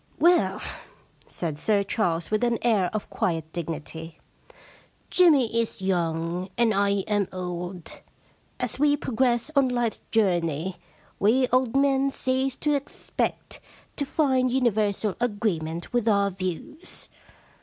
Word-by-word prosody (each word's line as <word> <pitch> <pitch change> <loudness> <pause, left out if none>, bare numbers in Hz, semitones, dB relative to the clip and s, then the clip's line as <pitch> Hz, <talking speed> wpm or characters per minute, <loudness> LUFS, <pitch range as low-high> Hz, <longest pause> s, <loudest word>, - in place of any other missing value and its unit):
* - - -31
Well,' 345 +2 +3 0.6
said 155 -4 -4
Sir 205 +1 +2
Charles, 175 -5 -1
with 215 +2 +1
an 235 -1 +2
air 210 -7 +3
of 215 -1 -4
quiet 160 -3 -2
.dignity, 160 -1 -6 0.5
* - - -27
Jimmy 290 -11 +5
is 230 - -4
young 170 0 -1
and 230 -2 +3
I 200 0 +2 0.2
am 205 -3 +1
old. 180 -1 -6 0.6
As 250 0 -2
we 290 0 +4
progress 250 0 0
on 275 -2 +4
life's 240 -2 -1
journey, 175 -5 +1 0.4
we 245 +6 +4
old 255 -1 +2
men 275 0 +3
cease 265 0 -1
to 300 - +3
expect 280 -1 -3 0.4
to - - -1
find 265 -3 +2
universal 215 -5 +1
agree 215 -6 0
ment 160 +6 -6
with 240 -2 +1
our 200 -2 +3
views. 185 - -5
215 Hz, 135 wpm, -26 LUFS, 180-255 Hz, 0.6 s, Jimmy